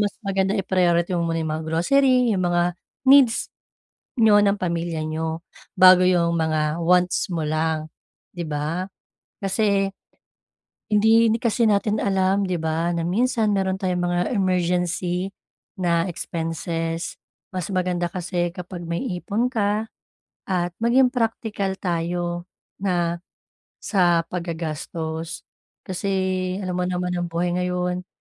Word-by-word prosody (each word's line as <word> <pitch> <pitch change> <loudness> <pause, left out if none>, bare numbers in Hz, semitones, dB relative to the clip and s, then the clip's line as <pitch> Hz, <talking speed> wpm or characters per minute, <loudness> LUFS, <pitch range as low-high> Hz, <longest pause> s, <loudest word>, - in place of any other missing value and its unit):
mas 205 -1 0
maganda 195 +1 +1
i-priority 180 -2 +1
mo 170 -1 0
muna 165 - -1
'yong 155 - -2
mga 155 0 -3
grocery, 250 +8 +3
'yong 190 - 0
mga 175 0 +2 0.5
needs 260 -5 +4 0.6
niyo 215 -3 +6
ng 200 0 +3
pamilya 170 -3 -2
niyo 160 +1 -3 0.3
bago 185 0 +8
'yong 170 -2 +2
mga 155 -1 0
wants 180 +2 +2
mo 165 -3 -2
lang, 155 0 -1 0.4
'di 170 -3 -5
ba? 155 +6 -2 0.5
Kasi 195 0 +1 1.0
hindi, 220 +2 +4
hindi 225 +3 0
kasi 230 0 +2
natin 210 +1 +2
alam 195 0 +1
'di 180 - -1
ba 165 +1 -1
na 165 - -1
minsan 220 +3 +1
mayro'n 190 -1 +1
tayong 185 -2 -1
mga 175 0 +1
emergency 180 -2 0 0.5
na 175 -2 +1
expenses. 165 0 -4 0.3
Mas 185 -3 -3
maganda 180 -2 -1
kasi 175 0 -2
kapag 180 -1 -7
may 170 +9 -2 0.2
ipon 235 +7 -1
ka 215 -1 -1 0.6
at 175 -2 0
maging 245 +2 +4
praktikal 220 -5 -1
tayo 175 0 -2 0.3
na 175 -3 0 0.6
sa 175 -4 +3
paggagastos. 160 -1 -4 0.4
Kasi 185 +1 -4 0.6
alam 180 -1 -2
mo - - +1
naman 180 0 -2
ang 175 -1 -2
buhay 170 +1 -1
ngayon, 180 0 -2
180 Hz, 130 wpm, -23 LUFS, 170-200 Hz, 1.0 s, bago